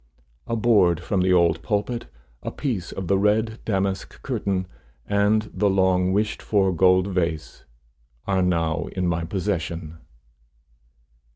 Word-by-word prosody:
A 115 Hz, -, -1 dB
board 105 Hz, -7 st, +3 dB
from 95 Hz, +1 st, -1 dB
the 95 Hz, 0 st, +2 dB
old 85 Hz, -2 st, +3 dB
pulpit, 105 Hz, -, -2 dB, 0.3 s
a -, -, -4 dB
piece 110 Hz, -, -3 dB
of 95 Hz, -2 st, -5 dB
the 95 Hz, +1 st, +2 dB
red 110 Hz, +2 st, +1 dB
damask 95 Hz, -2 st, -2 dB
curtain, 95 Hz, -2 st, -1 dB, 0.4 s
and 105 Hz, +1 st, +1 dB
the 105 Hz, -, +2 dB
long 95 Hz, -1 st, +2 dB
wished 105 Hz, +2 st, 0 dB
for 95 Hz, -3 st, +1 dB
gold 95 Hz, +1 st, +4 dB
vase, 85 Hz, -4 st, -3 dB, 0.6 s
are 95 Hz, -1 st, +1 dB
now 85 Hz, -3 st, 0 dB
in 90 Hz, -1 st, -1 dB
my 85 Hz, -1 st, 0 dB
possession. 85 Hz, -3 st, -3 dB
95 Hz, 130 wpm, -24 LUFS, 85-105 Hz, 0.6 s, gold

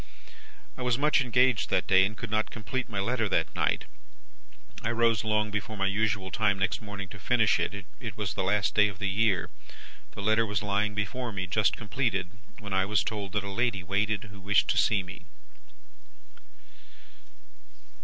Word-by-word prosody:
"I -, -, -7 dB
was 125 Hz, -1 st, +1 dB
much 150 Hz, +1 st, +3 dB
engaged 125 Hz, -2 st, +2 dB
that -, -, +1 dB
day, 95 Hz, 0 st, +5 dB
and 105 Hz, +1 st, -8 dB
could 115 Hz, -, -6 dB
not 110 Hz, 0 st, +1 dB
complete 120 Hz, +4 st, -4 dB
my 105 Hz, -3 st, -3 dB
letter 115 Hz, +1 st, 0 dB
that -, -, 0 dB
night. -, -, 0 dB, 1.0 s
I 115 Hz, -, -1 dB
rose 115 Hz, -1 st, +2 dB
long 105 Hz, -1 st, +1 dB
before 105 Hz, +1 st, -4 dB
my 95 Hz, -, 0 dB
usual 100 Hz, -1 st, 0 dB
time 105 Hz, -1 st, +2 dB
next 95 Hz, +3 st, -1 dB
morning 100 Hz, -2 st, -6 dB
to 95 Hz, -, -10 dB
finish 110 Hz, +1 st, +3 dB
it. 100 Hz, -1 st, -3 dB
It 115 Hz, -5 st, -6 dB
was 105 Hz, -2 st, -2 dB
the -, -, -2 dB
last 100 Hz, 0 st, +1 dB
day 105 Hz, 0 st, +5 dB
of 100 Hz, -3 st, -7 dB
the 100 Hz, -, -2 dB
year. 100 Hz, -1 st, +1 dB, 0.6 s
The 100 Hz, -, -7 dB
letter 110 Hz, +2 st, +3 dB
was 105 Hz, 0 st, -2 dB
lying 105 Hz, +1 st, 0 dB
before 115 Hz, +4 st, -2 dB
me 95 Hz, -2 st, -3 dB
just 100 Hz, +4 st, +1 dB
completed, 105 Hz, -5 st, -1 dB, 0.3 s
when 105 Hz, -4 st, -7 dB
I 95 Hz, 0 st, +3 dB
was 105 Hz, +2 st, +1 dB
told 105 Hz, -3 st, -4 dB
that 105 Hz, -1 st, 0 dB
a 100 Hz, -, -5 dB
lady 115 Hz, -3 st, 0 dB
waited, 100 Hz, +3 st, 0 dB
who 100 Hz, -2 st, -12 dB
wished 100 Hz, +1 st, +2 dB
to -, -, +1 dB
see 100 Hz, -3 st, +3 dB
me. 90 Hz, 0 st, -10 dB
105 Hz, 185 wpm, -28 LUFS, 100-110 Hz, 1.0 s, day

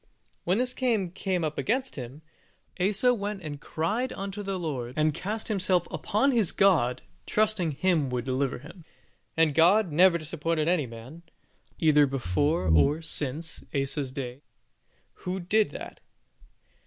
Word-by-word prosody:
When 180 Hz, +3 st, +2 dB
this 250 Hz, +1 st, +1 dB
king 225 Hz, -10 st, 0 dB
came 185 Hz, -1 st, -2 dB
up 155 Hz, -1 st, -2 dB
against 260 Hz, +4 st, -1 dB
him, 130 Hz, +3 st, -8 dB, 0.6 s
Asa 210 Hz, +7 st, +3 dB
went 205 Hz, -3 st, -4 dB
and 145 Hz, -2 st, -6 dB
cried 210 Hz, +14 st, -2 dB
unto 195 Hz, +1 st, -5 dB
the 195 Hz, -1 st, -3 dB
Lord, 130 Hz, -8 st, -4 dB
and 155 Hz, 0 st, +2 dB
cast 210 Hz, +8 st, -4 dB
himself 185 Hz, -4 st, +1 dB
upon 265 Hz, +7 st, +1 dB
his 225 Hz, -8 st, +2 dB
God, 130 Hz, -11 st, +3 dB, 0.2 s
trusting 210 Hz, -7 st, +1 dB
Him 155 Hz, -2 st, +1 dB
to 125 Hz, 0 st, -1 dB
deliver 130 Hz, +1 st, -1 dB
him, 165 Hz, +3 st, -13 dB, 0.5 s
and 160 Hz, -2 st, +4 dB
God 180 Hz, +4 st, +4 dB
never 175 Hz, +3 st, +5 dB
disappointed 160 Hz, 0 st, -2 dB
any 170 Hz, -6 st, +2 dB
man, 120 Hz, +8 st, -11 dB, 0.6 s
either 150 Hz, -3 st, +5 dB
before 135 Hz, -, 0 dB
or 145 Hz, -, +3 dB
since 155 Hz, +2 st, -3 dB
Asa's 135 Hz, -1 st, -1 dB
day, 130 Hz, -1 st, -6 dB, 0.8 s
who 185 Hz, +1 st, -3 dB
did 205 Hz, +4 st, +2 dB
that. -, -, -9 dB
165 Hz, 140 wpm, -27 LUFS, 145-195 Hz, 0.8 s, never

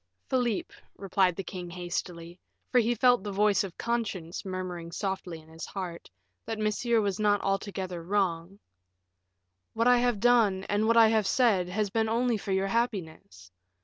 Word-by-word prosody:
"Philip," 245 Hz, -5 st, 0 dB, 0.2 s
replied 190 Hz, -2 st, +1 dB
the 195 Hz, -, -4 dB
king 180 Hz, -1 st, -7 dB
hastily, 175 Hz, 0 st, -5 dB, 0.3 s
for 250 Hz, -, +5 dB
he 240 Hz, +1 st, +1 dB
felt 245 Hz, 0 st, +4 dB
the 205 Hz, -, -4 dB
voice 205 Hz, 0 st, +2 dB
of 190 Hz, -3 st, -8 dB
conscience 205 Hz, -8 st, -3 dB
murmuring 185 Hz, -3 st, -5 dB
softly 190 Hz, -3 st, -4 dB
in 155 Hz, -, -18 dB
his 160 Hz, 0 st, -8 dB
heart, 180 Hz, -4 st, -6 dB, 0.4 s
that 225 Hz, -, -3 dB
Monsieur 215 Hz, +2 st, +1 dB
was 200 Hz, -2 st, -1 dB
not 205 Hz, -1 st, +3 dB
altogether 195 Hz, -3 st, -3 dB
wrong, 180 Hz, -1 st, -1 dB, 1.2 s
"what 230 Hz, +2 st, +2 dB
I 245 Hz, -1 st, +6 dB
have 245 Hz, -3 st, +1 dB
done, 220 Hz, -5 st, +3 dB
and 205 Hz, +2 st, 0 dB
what 230 Hz, +1 st, +4 dB
I 225 Hz, -1 st, +7 dB
have 220 Hz, -3 st, +2 dB
said, 200 Hz, -9 st, +2 dB
has 205 Hz, +1 st, -1 dB
been 220 Hz, 0 st, +1 dB
only 235 Hz, 0 st, +1 dB
for 200 Hz, -, -5 dB
your 190 Hz, 0 st, +1 dB
happiness. 160 Hz, -, -3 dB
195 Hz, 165 wpm, -28 LUFS, 180-225 Hz, 1.2 s, I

